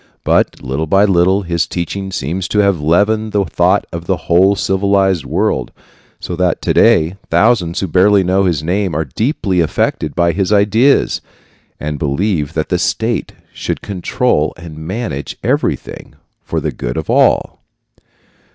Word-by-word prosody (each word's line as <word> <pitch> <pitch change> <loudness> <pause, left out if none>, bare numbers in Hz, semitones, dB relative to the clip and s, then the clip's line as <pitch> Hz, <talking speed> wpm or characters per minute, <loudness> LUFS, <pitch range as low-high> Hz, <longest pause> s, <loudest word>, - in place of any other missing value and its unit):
But, - - +1
little 70 +5 -3
by 100 +5 +4
little, 95 +1 +2
his 85 -3 -1
teaching 95 +3 -4
seems 90 +3 -3
to 105 - -3
have 100 -5 +2
leavened 105 +7 +1
the 100 -2 +1
thought - - +1
of 85 0 -7
the 95 - +1
whole 95 +4 +3
civilized 95 -4 +1
world, - - -1 0.5
so 90 - -5
that 90 -2 +1
to - - +1
day 80 +5 +3
thousands 85 -1 +2
who 95 - -1
barely 95 +3 +4
know 95 +2 +1
his 80 -5 0
name 90 +1 -1
are 80 +1 -1
deeply 105 - -1
affected 80 -2 -1
by 85 -1 +2
his 95 +3 -1
ideas, 105 +7 +3 0.6
and 75 -1 -4
believe 75 +1 -1
that 80 - -2
the - - 0
state - - -1 0.2
should - - -4
control 95 - -1
and 85 -2 -10
manage 80 - -5
everything - - -2 0.3
for - - -2
the - - -2
good - - -5
of 80 - -3
all. - - +2
90 Hz, 155 wpm, -15 LUFS, 80-100 Hz, 0.6 s, by